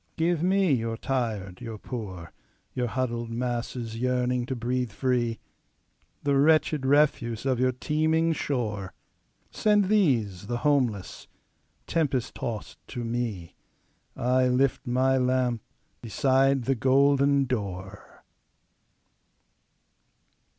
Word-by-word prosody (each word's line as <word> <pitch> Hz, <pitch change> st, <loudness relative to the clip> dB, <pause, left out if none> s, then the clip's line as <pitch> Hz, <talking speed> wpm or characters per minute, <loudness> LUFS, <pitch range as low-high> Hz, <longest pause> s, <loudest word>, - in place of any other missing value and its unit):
"Give 165 Hz, 0 st, +1 dB
me 190 Hz, 0 st, +3 dB
your 115 Hz, -2 st, -1 dB
tired, 110 Hz, -8 st, -3 dB
your 115 Hz, -3 st, -6 dB
poor, 95 Hz, -8 st, -7 dB, 0.4 s
Your 125 Hz, -1 st, -1 dB
huddled 120 Hz, -1 st, -2 dB
masses 120 Hz, -1 st, -3 dB
yearning 125 Hz, 0 st, 0 dB
to 130 Hz, -, -2 dB
breathe 125 Hz, 0 st, -2 dB
free, 120 Hz, -1 st, 0 dB, 0.8 s
The 140 Hz, -1 st, +2 dB
wretched 155 Hz, -2 st, +3 dB
refuse 135 Hz, -5 st, +2 dB
of 130 Hz, -3 st, +1 dB
your 130 Hz, 0 st, +3 dB
teeming 160 Hz, +5 st, +1 dB
shore. 110 Hz, -10 st, -3 dB, 0.6 s
Send 210 Hz, -3 st, +2 dB
these, 115 Hz, -, +1 dB
the 120 Hz, +1 st, -1 dB
homeless, 125 Hz, -9 st, 0 dB, 0.6 s
tempest 140 Hz, -7 st, -1 dB
tost 110 Hz, -3 st, -5 dB
to 120 Hz, -2 st, -5 dB
me,I 120 Hz, +3 st, -3 dB
lift 125 Hz, +1 st, +1 dB
my 130 Hz, +2 st, +2 dB
lamp 125 Hz, -2 st, +1 dB, 0.4 s
beside 135 Hz, +3 st, +2 dB
the 135 Hz, +3 st, +1 dB
golden 140 Hz, +2 st, +3 dB
door!" 100 Hz, -5 st, -6 dB
125 Hz, 100 wpm, -27 LUFS, 115-140 Hz, 0.8 s, me